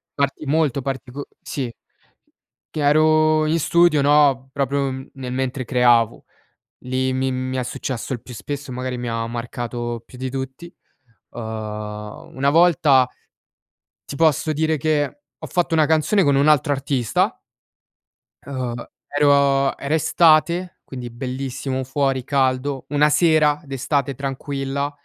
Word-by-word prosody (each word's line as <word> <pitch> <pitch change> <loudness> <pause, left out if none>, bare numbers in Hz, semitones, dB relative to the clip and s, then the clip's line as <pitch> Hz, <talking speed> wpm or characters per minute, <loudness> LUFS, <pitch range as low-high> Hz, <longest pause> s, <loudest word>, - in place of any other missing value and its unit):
parti 140 +1 -1
molto 145 -2 +1
partico 135 +1 -5
sì, 130 -4 -4 1.0
che - - -6
ero 155 +1 +4
in 165 +2 +1
studio, 170 -1 +4
no, 140 -2 +3
proprio 140 0 0 0.2
nel 130 -2 -6
mentre 130 0 -2
creavo. 120 -2 +3 0.6
Lì 130 +1 0
mi 130 0 0
mi 130 0 -3
è 130 - 0
successo 125 +1 -4
il 120 - -5
più 125 - -11
spesso, 140 +3 -6
magari 125 0 -4
mi 120 -1 -4
ha 115 0 -2
marcato, 120 0 -4
ehm, 115 - -7
più 125 - -14
di 130 +1 -4
tutti, 135 +6 -6 0.6
ehm, - - -8 1.0
una 140 +1 +2
volta 150 -6 +5 1.0
ti - - -7
posso 155 0 +2
dire 160 +1 +1
che 145 -1 -1 0.2
ho - - -8
fatto 175 -1 0
una 155 -1 +4
canzone 160 +5 +3
con 140 -2 +3
un 140 +2 +3
altro 150 -1 +4
artista. 135 -4 0 1.0
Ehm, 130 -3 -4 0.3
ero 140 -1 +3
era 140 +2 -3
estate, 170 +2 +3
quindi 125 -2 -7
bellissimo, 130 +1 -4
fuori 135 -1 0
caldo. 135 0 0
Una 150 +1 +3
sera 150 -2 +3
d'estate 135 0 -1
tranquilla, 140 +1 -3
140 Hz, 135 wpm, -21 LUFS, 130-150 Hz, 1.0 s, volta